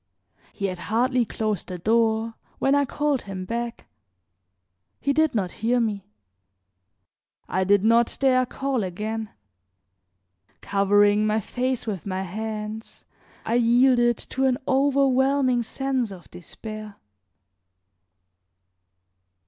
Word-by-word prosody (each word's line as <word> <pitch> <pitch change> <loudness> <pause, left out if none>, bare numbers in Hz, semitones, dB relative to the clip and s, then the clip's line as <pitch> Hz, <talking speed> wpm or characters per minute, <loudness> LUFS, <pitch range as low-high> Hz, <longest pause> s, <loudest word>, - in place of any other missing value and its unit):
He 200 - -4
had 185 -2 -3
hardly 245 +2 +2
closed 215 -3 -3
the 180 - -5
door 225 +3 +1 0.2
when 270 - +2
I 285 0 +3
called 290 0 -1
him 190 -2 -6
back. 235 +3 -4 1.1
He 280 - 0
did 315 -2 +2
not 190 -5 0
hear 240 +2 +2
me; 210 -4 -2 1.4
I 190 - 0
did 200 +1 +3
not 230 +1 +3
dare 255 -2 +3
call 270 -3 -2
again; 215 +4 -4 1.3
covering 205 +1 +3
my 215 +1 +1
face 255 +4 -2
with 205 -4 -4
my 190 0 -2
hands 215 +3 -6 0.4
I 225 - -1
yielded 240 0 +4
to 265 0 -2
an 255 -2 +2
overwhelming 270 -1 +3
sense 260 0 -2
of 185 -4 -12
despair. 215 +4 -9
225 Hz, 110 wpm, -24 LUFS, 205-255 Hz, 1.4 s, yielded